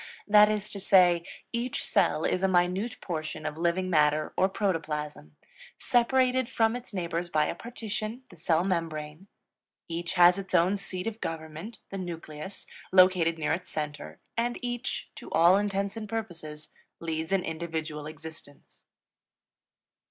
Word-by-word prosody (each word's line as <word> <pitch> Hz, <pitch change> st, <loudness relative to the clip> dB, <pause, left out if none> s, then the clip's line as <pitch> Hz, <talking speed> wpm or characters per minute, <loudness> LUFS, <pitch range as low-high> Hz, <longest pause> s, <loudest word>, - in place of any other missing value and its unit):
That 210 Hz, 0 st, +7 dB
is 210 Hz, -1 st, -2 dB
to 200 Hz, -, -6 dB
say, 180 Hz, -3 st, +5 dB, 0.3 s
each 235 Hz, +1 st, -1 dB
cell 165 Hz, -6 st, +2 dB
is 185 Hz, -, +1 dB
a 190 Hz, -, +3 dB
minute 185 Hz, +5 st, +1 dB
portion 155 Hz, -3 st, -4 dB
of 150 Hz, -, -2 dB
living 170 Hz, +3 st, 0 dB
matter, 150 Hz, -3 st, +2 dB
or 190 Hz, -, +3 dB
protoplasm, 150 Hz, -, -3 dB, 0.4 s
separated 255 Hz, +1 st, +2 dB
from 225 Hz, 0 st, +2 dB
its 245 Hz, 0 st, -8 dB
neighbors 175 Hz, -2 st, -2 dB
by 155 Hz, -2 st, +2 dB
a -, -, -1 dB
partition, 230 Hz, 0 st, -5 dB
the 175 Hz, -, -14 dB
cell 165 Hz, +1 st, +2 dB
membrane; 165 Hz, -2 st, -3 dB, 0.6 s
each 170 Hz, +2 st, -3 dB
has 180 Hz, +1 st, +6 dB
its 190 Hz, -1 st, -3 dB
own 185 Hz, +4 st, +4 dB
seat 185 Hz, -2 st, -4 dB
of 225 Hz, 0 st, -4 dB
government, 160 Hz, +6 st, -6 dB
the 195 Hz, -, -4 dB
nucleus, 170 Hz, 0 st, -7 dB, 0.3 s
located 185 Hz, -3 st, +5 dB
near 155 Hz, -2 st, 0 dB
its 180 Hz, +2 st, -4 dB
center; 150 Hz, -1 st, -5 dB, 0.2 s
and 240 Hz, +1 st, 0 dB
each, 240 Hz, 0 st, -3 dB
to -, -, -9 dB
all 170 Hz, +3 st, +6 dB
intents 200 Hz, 0 st, 0 dB
and 215 Hz, -2 st, -6 dB
purposes, 165 Hz, -9 st, -6 dB, 0.3 s
leads 160 Hz, 0 st, -3 dB
an 195 Hz, -2 st, +2 dB
individual 160 Hz, -2 st, -4 dB
existence. 155 Hz, -2 st, -11 dB
180 Hz, 145 wpm, -28 LUFS, 160-205 Hz, 0.6 s, That